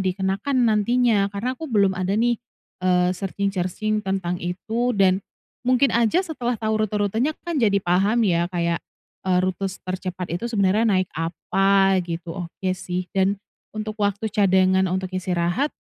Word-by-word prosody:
dikenakan 195 +7 0
nantinya 220 -1 +3
karena 245 +5 -1
aku 315 +4 -7
belum 200 -4 +3
ada 185 +2 -1
nih, 235 +1 +1 0.4
eee, 180 0 +2
searching-searching 200 +2 -2
tentang 190 -3 -2
itu 220 +8 -2
dan 190 -1 +4 0.5
mungkin 255 0 +4
aja 235 +9 +3
setelah 250 -8 -2
tahu 220 0 -1
rute-rutenya 215 +8 0
kan 340 -5 -1
jadi 205 -4 +3
paham 200 +7 +2
ya 170 -2 +2
kayak, 170 -1 0 0.4
eee, 185 -1 +2
rute 185 +1 -1
s 190 0 -4
tercepat 185 -1 -5
itu 230 - -7
sebenarnya 210 -2 +2
naik 185 -4 +2
apa 195 +4 +2
gitu, 170 0 -5 0.2
oke 185 +2 -3
sih 180 0 -4
dan 195 +1 +2 0.4
untuk 215 0 -4
waktu 205 +1 0
cadangan 190 -2 +3
untuk 185 0 -2
istirahat, 185 - -1
195 Hz, 150 wpm, -23 LUFS, 185-220 Hz, 0.5 s, dan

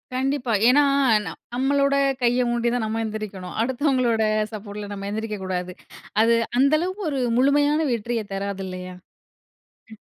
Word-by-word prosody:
கண்டிப்பா. 265 -1 -1 0.2
ஏனா, 285 +4 +6 0.7
நம்மளோட 280 +2 +2 0.3
கைய 245 +1 +2
ஊண்டிதான் 240 0 0
நம்ம 225 +1 -2
எந்திரிக்கணும். 210 -4 -6
அடுத்தவங்களோட 255 -2 +1 0.3
சப்போர்ட்டில 205 -1 -7
நம்ம 200 0 -6
எந்திரிக்க 215 0 -3
கூடாது. 180 -1 -3 0.5
அது 230 +1 +4 0.2
அந்த 275 +2 +4
அளவுக்கு 370 +4 -3
ஒரு 275 - -1 0.2
முழுமையான 290 +3 +3
வெற்றிய 235 -1 -2
தராது 195 0 -3
இல்லையா? 185 0 -7 1.0
ம். - - -11
235 Hz, 125 wpm, -23 LUFS, 205-270 Hz, 1.0 s, ஏனா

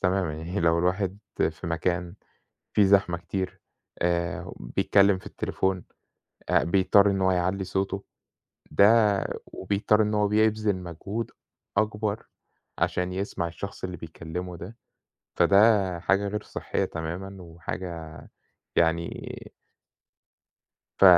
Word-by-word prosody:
تمامًا 90 -4 +1
يعني 85 +6 -4
لو 85 0 +3
الواحد 95 +2 0 0.3
في 80 +2 -9
مكان 85 +1 -1 0.6
فيه 105 - +5
زحمة 95 -3 +4
كتير، 95 +2 -4 0.4
آآ 85 0 -1
بيتكلم 100 +11 +3
في 95 - -15
التليفون، 95 -2 -2 0.6
آآ، - - +4
بيضطر 100 +3 +4
إن 95 -1 -1
هو 95 0 +4
يعلّي 90 +2 0
صوته، 95 +1 -2 0.7
ده 100 +7 +6 0.6
وبيضطر 105 +3 +1
إنه 105 0 +1
هو 105 - +3
بيبذل 110 -1 +2
مجهود 95 +6 -5 0.5
أكبر 105 0 0 0.5
عشان 90 0 0
يسمع 95 -3 -2
الشخص 100 +4 -7
اللي 90 -1 -4
بيكلمه 85 +2 -6
ده، 95 +7 -9 0.6
فده 100 -3 +4
حاجة 100 +3 +2
غير 105 +1 -3
صحّية - - -2
تمامًا 90 +5 -5
وحاجة 85 -1 -6 0.6
يعني 85 0 0 1.5
ف - - +5
95 Hz, 115 wpm, -27 LUFS, 85-100 Hz, 1.5 s, ده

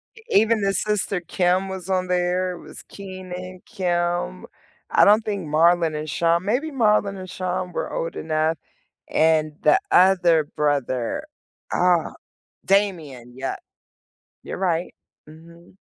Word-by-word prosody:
E 455 - -15
even 220 +1 +3
the 195 0 +1
sister 205 -3 0
Kim 180 +2 0
was 190 -1 -7
on 185 -1 0
there. 180 0 0
It 175 - -10
was - - -10
Keenen, 185 -1 -9
Kim, 175 - -2 0.4
I - - +4
don't 215 +2 +5
think 200 -6 -3
Marlon 165 0 +3
and 155 0 -5
Shawn, 170 +4 +1
maybe 270 +9 0
Marlon 210 -5 +2
and 185 -1 -8
Shawn 185 0 -3
were - - -3
old 165 - -3
enough, 155 0 0 0.5
and 155 -1 +2
the 375 - +5
other 175 -4 +5
brother, 140 - -1 0.5
ah, 175 -2 +2 0.5
Damien. 160 - 0
Yep. 135 +1 -4 0.8
You're - - -6
right. 175 -2 -1 0.3
Mhm. 170 +3 -16
180 Hz, 130 wpm, -23 LUFS, 160-190 Hz, 0.8 s, don't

